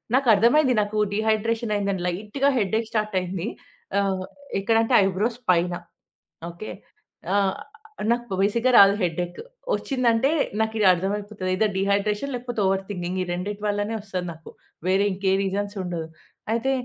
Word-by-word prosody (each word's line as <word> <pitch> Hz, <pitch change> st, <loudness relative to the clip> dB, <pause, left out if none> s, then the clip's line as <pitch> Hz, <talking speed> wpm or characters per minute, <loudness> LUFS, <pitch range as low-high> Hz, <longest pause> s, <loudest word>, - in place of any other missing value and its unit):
నాకర్థమైంది. 250 Hz, +3 st, +4 dB
నాకు 205 Hz, +1 st, -3 dB, 0.2 s
డీహైడ్రేషన్ 220 Hz, +1 st, 0 dB
అయిందని. 200 Hz, -3 st, -1 dB
లైట్‌గా. 210 Hz, +10 st, 0 dB
హెడ్డేక్ 220 Hz, +2 st, 0 dB
స్టార్ట్ 215 Hz, -2 st, -1 dB
అయింది. 180 Hz, +1 st, -4 dB, 0.5 s
ఆహ్, 190 Hz, -2 st, 0 dB, 0.4 s
ఎక్కడ 225 Hz, +3 st, +1 dB
అంటే 230 Hz, -, -1 dB
ఐబ్రోస్ 210 Hz, +5 st, -1 dB
పైన. 175 Hz, 0 st, +2 dB, 0.8 s
ఓకే. 170 Hz, +6 st, -8 dB, 0.6 s
ఆ! -, -, +3 dB, 0.8 s
నాకు 240 Hz, -4 st, -1 dB
బేసిక్‌గా 235 Hz, +5 st, +2 dB
రాదు. 200 Hz, 0 st, +8 dB
హెడ్డెక్ 175 Hz, 0 st, -2 dB, 0.4 s
వచ్చిందంటే 250 Hz, -1 st, +1 dB, 0.3 s
నాకు 220 Hz, 0 st, 0 dB
ఇదర్థమైపోతది 200 Hz, +1 st, +1 dB
ఐదర్ 210 Hz, +3 st, +1 dB
డీహైడ్రేషన్ 205 Hz, +6 st, 0 dB
లేకపోతే 245 Hz, -2 st, -5 dB
ఓవర్ 190 Hz, 0 st, +2 dB
థింకింగ్ 180 Hz, -2 st, -3 dB
ఈ -, -, +1 dB
రెండిటి 200 Hz, +4 st, -4 dB
వల్లనే 205 Hz, +1 st, -1 dB
వస్తుంది 190 Hz, -3 st, -4 dB
నాకు. 160 Hz, 0 st, -14 dB, 0.4 s
వేరే 190 Hz, +2 st, +3 dB
ఇంకే 190 Hz, 0 st, 0 dB
రీజన్స్ 200 Hz, +2 st, -2 dB
ఉండవు. 170 Hz, -3 st, -4 dB, 0.4 s
అయితే 235 Hz, +4 st, +1 dB
205 Hz, 130 wpm, -24 LUFS, 190-225 Hz, 0.8 s, రాదు